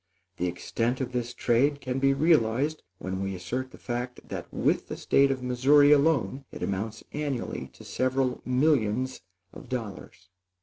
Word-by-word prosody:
The 90 - 0
extent 115 +8 -1
of 130 -2 -3
this 120 -1 -2
trade 135 +6 +2
can 130 -1 -3
be 135 0 +4
realized 145 -1 +2 0.2
when 95 +1 -4
we 95 0 -2
assert 125 +9 -4
the - - -14
fact 125 0 -5
that - - -6
with - - +1
the - - -5
State 140 0 +3
of 130 -2 -2
Missouri 135 +4 +5
alone 145 -2 +3
it - - -7
amounts 105 +3 -3
annually 145 -5 -3
to - - -14
several 130 0 0
millions 130 -2 +1 0.3
of - - -12
dollars. 100 -7 -6
125 Hz, 160 wpm, -27 LUFS, 115-140 Hz, 0.3 s, Missouri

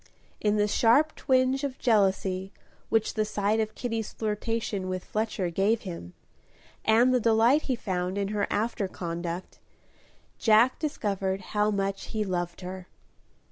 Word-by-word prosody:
In 210 0 +1
the 210 0 +3
sharp 245 +9 +3
twinge 260 +1 +2
of 270 -2 -3
jealousy 195 -4 +1 0.4
which 220 -1 +1
the 215 - +1
sight 210 +1 0
of 220 -1 -2
Kitty's 225 -3 -3
flirtation 210 -2 -2
with 185 -1 -3
Fletcher 215 -5 -2
gave 205 +6 +2
him, 170 - -8 0.7
and 235 +4 +4
the 250 - +4
delight 230 +5 +4
he 260 - +2
found 185 -4 -2
in 200 -1 -1
her 205 -1 0
after 210 -1 -1
conduct, 170 0 -5 0.8
Jack 225 +3 +4
discovered 200 - -2
how 210 0 +2
much 195 -1 -2
he 215 -1 -2
loved 175 -2 -3
her. 185 0 -7
210 Hz, 140 wpm, -27 LUFS, 190-225 Hz, 0.8 s, and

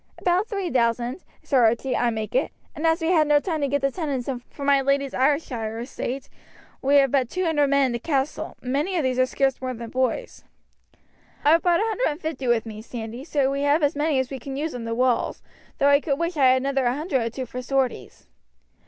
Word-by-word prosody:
"About 365 +4 +1
three 395 -6 -3
thousand, 240 +4 0 0.2
Sir 265 -4 +3
Archie, 235 +3 +2
I 245 - +2
make 220 -2 -4
it; - - +1 0.2
and 320 +1 0
as 325 +1 +2
we 325 - 0
had 315 -4 +4
no 295 0 +5
time 315 -1 -3
to 280 - +1
get 285 +1 0
the 275 - +2
tenants 285 -8 -3
in 265 -3 -2
from 280 - -7
my 280 -1 +4
lady's 275 0 0
Ayrshire 255 -5 0
estate, 255 +2 -5 0.5
we 275 +2 +3
have 275 -2 +5
but 260 -4 +1
two 370 +5 -2
hundred 295 -3 +2
men 280 0 +3
in 255 - 0
the 235 - -2
castle, 295 +3 -2
and 250 0 -3
many 355 +7 0
of 320 - +1
these 255 -1 0
are 255 - +4
scarce 270 0 0
more 255 -1 -3
than 230 0 -8
boys." 260 - -2 1.0
"I 295 - +6
have 330 +1 +5
brought 350 0 +3
a - - +2
hundred 450 +2 0
and 295 0 -3
fifty 310 -6 -4
with 235 -1 +2
me, 215 -1 -8
Sandy, 230 +2 -7
so 280 -3 0
we 275 0 -2
have 290 +2 +2
as 290 +1 +2
many 295 -1 +1
as 260 0 -1
we 270 - -5
can 270 +3 -6
use 310 +2 -2
on 240 -2 -6
the 230 0 -2
walls, 250 0 0 0.3
though 280 - +4
I 285 0 +6
could 280 -3 -1
wish 335 +2 -2
I 280 -3 +3
had 255 0 +5
another 270 -2 +1
hundred 285 0 -1
or 230 - -1
two 255 +3 -5
for 250 +2 -6
sorties." 265 0 -2
275 Hz, 240 wpm, -24 LUFS, 250-305 Hz, 1.0 s, I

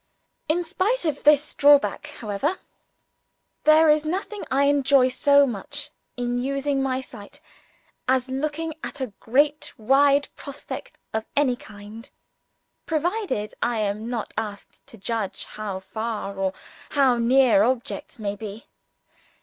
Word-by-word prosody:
In 345 +3 +2
spite 380 +7 0
of 300 -3 -2
this 295 0 +5
drawback, 290 0 +4
however, 235 - -3 1.1
there 310 +1 +7
is 300 0 +4
nothing 385 +6 -3
I 275 +2 +2
enjoy 275 -2 +4
so 285 +2 +4
much 285 +6 -5 0.3
in 245 0 -1
using 275 +1 -1
my 260 -1 0
sight 215 -6 -12 0.7
as 260 0 +2
looking 305 +4 -3
at - - -6
a 255 -6 -4
great 290 +5 +1
wide 275 +5 +4
prospect 280 0 -8 0.2
of 220 0 -2
any 280 -4 +3
kind 215 +2 -12 0.8
provided 320 - -1
I 235 -1 0
am 210 +2 -2
not 235 -3 -4
asked 205 -2 -6
to 225 - -11
judge 215 0 -3
how 205 -3 -5
far 210 +1 -4
or 190 -1 -1 0.4
how 265 -4 +3
near 240 -3 +5
objects 230 -3 -1
may 205 -2 -3
be. 215 +1 -8
260 Hz, 130 wpm, -24 LUFS, 220-290 Hz, 1.1 s, there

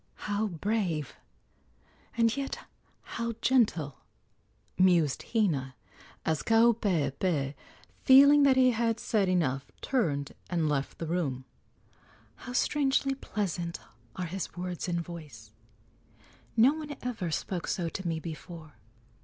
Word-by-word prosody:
"How 210 +1 0
brave, 175 - -2 1.0
and 230 0 +3
yet 275 -1 -3 0.5
how 235 0 -4
gentle!" 205 - +2 0.8
mused 175 -7 +3
Hina, 150 - 0 0.5
as 160 -2 0
Kaupeepee, 180 - +2 0.5
feeling 280 +2 +8
that 275 -2 +5
he 255 -1 +6
had 230 -1 0
said 205 -5 +1
enough, 140 -7 0
turned 150 - -1 0.2
and 170 -3 0
left 140 -2 -1
the 165 - -4
room. 150 -7 -2 0.9
"How 250 - -8
strangely 275 0 +1
pleasant 180 -9 -3 0.4
are 185 - -3
his 180 +1 -5
words 180 0 -4
and 170 -1 0
voice! 150 -11 -10 1.1
No 245 +6 +6
one 300 -3 -6
ever 230 -8 -3
spoke 175 +2 -3
so 175 -3 -1
to 190 +1 -5
me 165 -1 -1
before. 160 -3 -9
180 Hz, 115 wpm, -29 LUFS, 155-230 Hz, 1.1 s, feeling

